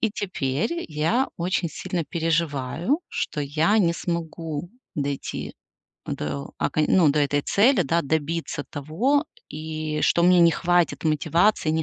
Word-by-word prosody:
И 225 - +2
теперь 185 - -2
я 165 - +1
очень 175 0 -1
сильно 180 -1 -4
переживаю, 165 - -1
что 150 - -3
я 160 +9 +2
не 170 -4 +3
смогу 165 -1 -4 0.2
дойти 140 -1 -4 0.5
до 70 -1 -4
окон 155 - +1
ну, 175 -5 +5
до 150 - 0
этой 145 0 +1
цели, 245 +7 +4
да, 165 +5 +1
добиться 155 0 -2
того, 220 - 0 0.2
и 155 0 -4
что 170 - +3
мне 180 0 +6
не 170 -1 +6
хватит 175 0 +1
мотивации, 160 +3 +2
не 160 0 +1
165 Hz, 135 wpm, -24 LUFS, 150-180 Hz, 0.5 s, мне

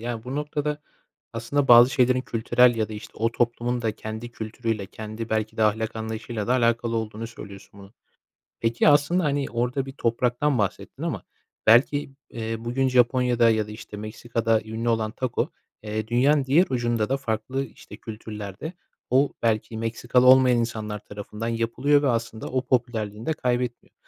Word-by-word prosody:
Ya, 115 -1 -4
bu 130 +2 -4
noktada 150 0 -2 0.5
aslında 135 +5 -1
bazı 120 +1 +9
şeylerin 130 -1 +3
kültürel 120 0 +3
ya 110 -1 0
da, - - -8
işte, 105 - -9
o 115 +1 +1
toplumun 120 +1 0
da 110 -1 0
kendi 110 +3 -7
kültürüyle, 110 -2 -3
kendi 110 +3 -7
belki 110 0 -1
de 110 - +1
ahlak 110 +1 +1
anlayışıyla 110 -1 -4
da 125 - +2
alakalı 115 -2 +1
olduğunu 110 0 -4
söylüyorsun 100 -3 -12
bunun. 100 +1 -14 0.7
Peki, 115 +4 +2
aslında, 150 +5 +4
hani, 140 -1 0
orada 125 +3 -1
bir 135 - -7
topraktan 125 +2 0
bahsettin 100 -3 -3
ama - - -2 0.4
belki, 135 +6 +4 0.2
eee, 115 -1 -4
bugün 120 +4 0
Japonya'da 125 -1 +3
ya 110 -1 +1
da, - - -10
işte, 105 -1 -9
Meksika'da 115 +1 -1
ünlü 110 +2 -4
olan 110 -2 +1
tako, 130 -2 -2 0.3
eee, 110 0 -3
dünyanın 135 +5 +3
diğer 150 +8 +4
ucunda 120 -3 0
da 135 - +1
farklı 130 +1 -2
işte 110 -4 -13
kültürlerde 105 - -7 0.4
o 135 +3 +3
belki 110 -1 0
Meksikalı 120 +2 +1
olmayan 130 -1 +7
insanlar 110 -2 -3
tarafından 105 +2 -6
yapılıyor 120 +6 +2
ve 140 - +2
aslında 115 -2 -2
o 130 0 -2
popülerliğini 115 -4 -1
de 160 - +2
kaybetmiyor. 125 -4 -2
115 Hz, 160 wpm, -25 LUFS, 110-130 Hz, 0.7 s, bazı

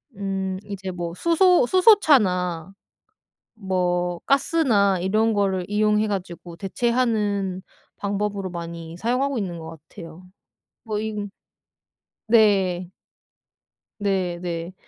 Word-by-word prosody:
음 195 -1 -3
이제 190 -2 -6
뭐 175 -1 -5
수소 340 - +4
수소차나 200 - +3 0.8
뭐 180 -3 -1
가스나 240 - +2
이런 215 +5 +1
거를 195 -3 0
이용해 210 +1 +2
가지고 180 -4 -5
대체하는 205 -2 -1 0.4
방법으로 200 -1 -2
많이 170 -1 -7
사용하고 250 +6 0
있는 180 -5 -4
것 160 0 -9
같아요. 165 -2 -11 0.6
뭐 215 -2 -3
이 220 0 -4 1.1
네. 195 -6 +3 1.1
네 190 -4 -1
네. 170 0 -4
195 Hz, 200 characters per minute, -23 LUFS, 180-220 Hz, 1.1 s, 수소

